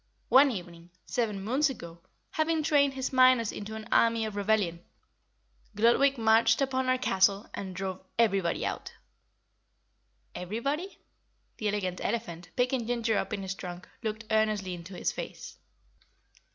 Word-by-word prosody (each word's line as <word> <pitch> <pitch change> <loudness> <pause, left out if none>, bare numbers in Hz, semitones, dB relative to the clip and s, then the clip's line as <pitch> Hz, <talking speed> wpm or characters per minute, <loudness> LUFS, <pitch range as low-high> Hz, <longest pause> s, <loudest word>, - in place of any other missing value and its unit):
One 275 +2 +7
evening, 175 -6 -7 0.2
seven 210 -5 -2
moons 265 +8 +2
ago, 170 -9 -8 0.3
having 315 0 0
trained 285 -3 +3
his 265 0 -3
miners 255 -3 +5
into 215 +1 -7
an 220 -1 -7
army 230 -1 +3
of 215 -2 -5
rebellion, 200 -5 0 0.9
Gludwig 240 +6 +4
marched 225 0 +4
upon 260 -1 0
our 255 - +3
castle 195 -3 +2
and 190 -2 -6
drove 190 -1 -4
everybody 195 -7 +2
out." - - -4 1.4
"Everybody?" 275 - -3 0.6
The 215 - -2
Elegant 195 -3 -2
Elephant, 175 -7 -3
picking 250 -2 0
Ginger 235 -2 0
up - - -4
in 200 -3 -3
his 190 0 -3
trunk, 180 -2 -8
looked 220 0 -4
earnestly 215 -4 +1
into 175 +2 -9
his - - -1
face. - - -8
220 Hz, 140 wpm, -29 LUFS, 190-255 Hz, 1.4 s, One